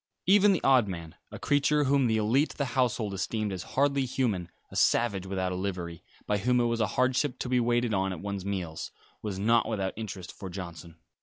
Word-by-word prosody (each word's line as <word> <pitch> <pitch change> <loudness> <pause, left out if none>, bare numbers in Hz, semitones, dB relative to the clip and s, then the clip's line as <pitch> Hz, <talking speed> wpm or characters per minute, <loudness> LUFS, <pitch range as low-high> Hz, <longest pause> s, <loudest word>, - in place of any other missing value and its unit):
Even 205 +2 +6
the 185 - 0
odd 130 -5 +5
man, 85 -4 -6 0.2
a - - -8
creature 145 +1 +2
whom 135 -2 +3
the 110 -1 +2
élite 120 +8 +2
of - - -23
the 140 - 0
household 120 -5 +1
esteemed 105 +1 -2
as 90 - -4 0.2
hardly 140 0 +3
human 115 -9 -1 0.2
a - - -10
savage 100 -5 +2
without 95 -1 -1
a - - -2
livery, 90 -3 -4 0.2
by 105 0 0
whom 125 +4 +2
it 120 - +3
was 115 -1 0
a 110 - +2
hardship 130 +2 +2
to - - -4
be 125 0 +2
waited 120 -1 +1
on 95 -1 +1
at 90 - -5
one's 100 0 -4
meals 90 -5 -4 0.3
was 105 -3 -4
not 115 +4 +3
without 100 -4 -1
interest 100 -4 -6
for 95 - -8
Johnson. 85 -3 -8
110 Hz, 215 wpm, -28 LUFS, 95-125 Hz, 0.3 s, Even